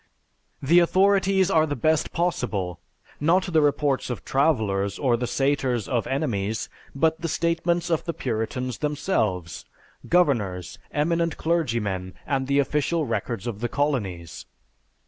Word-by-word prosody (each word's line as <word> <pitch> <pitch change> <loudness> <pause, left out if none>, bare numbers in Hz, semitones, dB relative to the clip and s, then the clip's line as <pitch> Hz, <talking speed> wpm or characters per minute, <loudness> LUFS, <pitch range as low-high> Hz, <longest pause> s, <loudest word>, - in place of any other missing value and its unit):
"The 170 +6 +6
authorities 190 +1 +3
are 160 -3 +4
the 145 - -2
best 155 +5 +1
possible, 105 - -2 0.4
not 175 +4 +2
the 160 - +5
reports 145 -2 +1
of 125 - -5
travelers 105 - +1
or 130 -4 +2
the 120 +1 -2
satires 135 -5 0
of 120 -3 -1
enemies, 110 -7 -2 0.3
but 160 +2 +1
the 165 - -1
statements 170 +1 0
of 165 - 0
the 170 - -2
Puritans 120 +1 -3
themselves, 110 - -1 0.5
governors, 110 - +1
eminent 165 +2 0
clergymen, 115 - -1
and 135 -2 -1
the 140 0 +2
official 150 +3 +1
records 115 -6 -3
of 115 -4 -4
the 120 +1 -2
colonies. 100 - -2
140 Hz, 130 wpm, -25 LUFS, 110-165 Hz, 0.5 s, The